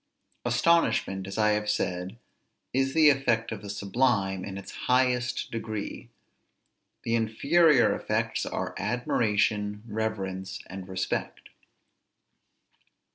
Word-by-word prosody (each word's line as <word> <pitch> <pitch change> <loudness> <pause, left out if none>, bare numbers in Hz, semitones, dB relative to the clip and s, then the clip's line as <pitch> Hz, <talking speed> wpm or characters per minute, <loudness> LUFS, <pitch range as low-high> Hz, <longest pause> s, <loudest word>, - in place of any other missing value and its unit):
Astonishment, 120 - +2
as 100 - -6
I 105 -1 +4
have 105 0 0
said, 90 -1 -2 0.6
is 135 +1 +1
the 155 -2 +7
effect 120 -5 0
of 110 -3 -5
the 100 - -8
sublime 100 -2 0
in 95 0 -6
its 100 - -8 0.2
highest 125 -1 +1
degree; 110 +1 -5 0.9
the 115 - -1
inferior 130 +6 +4
effects - - -1
are - - -3
admiration, 105 -3 0
reverence, 100 -3 -3
and 95 0 -8
respect. 95 0 -3
110 Hz, 105 wpm, -27 LUFS, 100-125 Hz, 0.9 s, the